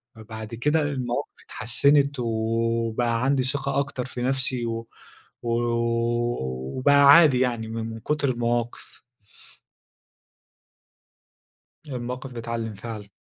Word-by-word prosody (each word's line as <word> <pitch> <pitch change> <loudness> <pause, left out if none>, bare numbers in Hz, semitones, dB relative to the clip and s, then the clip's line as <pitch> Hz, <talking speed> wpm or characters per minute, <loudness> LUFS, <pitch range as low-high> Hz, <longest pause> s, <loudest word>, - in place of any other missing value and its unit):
ب 110 - -15
بعد 110 0 -7
كده 150 +6 +1
المواقف 135 -2 -2
اتحسنت 140 +4 +3
وبقى 115 +1 0
عندي 135 -1 +2
ثقة 140 +1 -1
أكتر 140 -3 -3
في 125 -1 -6
نفسي 130 -1 0
و 115 0 -4 0.6
وبقى 115 - 0 0.2
عادي 150 -6 +6
يعني 120 -3 0
من 110 0 -4
من 115 0 -7
كتر 150 +3 -1
المواقف. 120 -1 -3 2.9
المواقف 125 0 -5
بتعلِّم 115 -1 -4
فعلًا. 105 -1 -8
120 Hz, 100 wpm, -25 LUFS, 115-130 Hz, 2.9 s, عادي